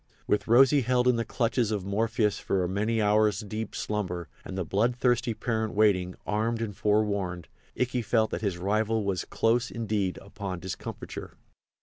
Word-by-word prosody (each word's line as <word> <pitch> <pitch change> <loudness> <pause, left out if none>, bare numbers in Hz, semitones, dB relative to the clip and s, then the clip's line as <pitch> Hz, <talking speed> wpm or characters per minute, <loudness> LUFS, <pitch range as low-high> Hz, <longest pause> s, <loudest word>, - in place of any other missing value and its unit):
With 105 - 0
Rosy 135 +5 +6
held 125 +1 +2
in 125 -2 +4
the 115 - 0
clutches 115 0 0
of 105 -4 -2
Morpheus 105 +1 0
for 95 -2 0
a - - 0
many 105 +5 0
hours 105 -1 +3
deep 110 +1 -5
slumber, 90 -6 -3
and 95 - -7
the 95 - -1
bloodthirsty 120 +4 +1
parent 110 -1 -2
waiting, 95 -4 +3
armed 110 +2 0
and 110 -3 -3
forewarned, 100 -5 0 0.3
Ikey 125 0 +1
felt 110 -1 +1
that - - -3
his 100 -5 -1
rival 110 +4 0
was 95 -4 -1
close, 120 +2 +1
indeed, 105 -5 -1
upon 95 -2 -6
discomfiture. 95 +1 -7
105 Hz, 160 wpm, -28 LUFS, 100-115 Hz, 0.3 s, Rosy